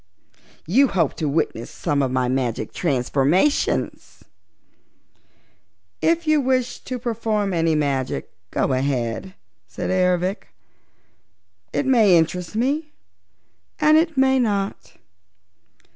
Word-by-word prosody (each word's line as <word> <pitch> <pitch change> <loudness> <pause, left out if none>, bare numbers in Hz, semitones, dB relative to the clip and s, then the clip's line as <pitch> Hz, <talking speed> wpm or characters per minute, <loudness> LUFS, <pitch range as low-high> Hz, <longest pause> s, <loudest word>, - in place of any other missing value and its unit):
You 255 - +4
hope 170 - 0
to 155 - -1
witness 140 -6 -2
some 145 -1 -1
of 135 - 0
my 130 0 0
magic 125 -2 -2
transformations?" 145 - 0 1.8
"If 335 0 +1
you 310 -1 +3
wish 255 -1 0
to 255 - -4
perform 220 -4 -1
any 165 -2 +1
magic, 140 -4 -2 0.2
go 135 - 0
ahead," 130 +5 -2 0.3
said 90 - -4
Ervic. 180 +1 0 1.2
"It - - -1
may 220 -9 +5
interest 175 +4 -1
me 290 +7 -1 0.9
and 305 0 +5
it 320 -1 +2
may 265 0 +4
not. 200 - -2
185 Hz, 105 wpm, -22 LUFS, -, 1.8 s, may